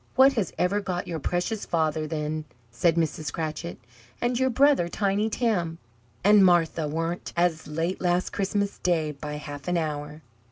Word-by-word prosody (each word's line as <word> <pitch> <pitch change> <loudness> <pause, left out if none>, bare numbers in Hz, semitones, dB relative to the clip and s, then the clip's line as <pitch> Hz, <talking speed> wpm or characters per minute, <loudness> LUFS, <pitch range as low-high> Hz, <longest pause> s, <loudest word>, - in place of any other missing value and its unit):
"What 265 +1 +7
has 215 -6 -1
ever 200 +3 +1
got 180 -3 -3
your 165 -2 -3
precious 180 +8 -1
father, 155 -2 0
then?" 155 0 -3 0.3
said 170 -2 +2
Mrs. 155 -3 -1
Cratchit. 160 +1 -4 0.4
"And 240 0 0
your 260 0 +3
brother, 270 -7 +4
Tiny 205 +3 0
Tim? 190 -9 0 0.5
And 205 +1 +7
Martha 170 -3 +3
warn't 165 +3 -3
as 170 -3 +1
late 165 +4 -2
last 180 0 +1
Christmas 200 +1 -1
Day 165 -4 +1
by 150 +1 -7
half 145 -1 -7
an 180 0 +1
hour!" 150 -1 -4
170 Hz, 160 wpm, -26 LUFS, 155-200 Hz, 0.5 s, What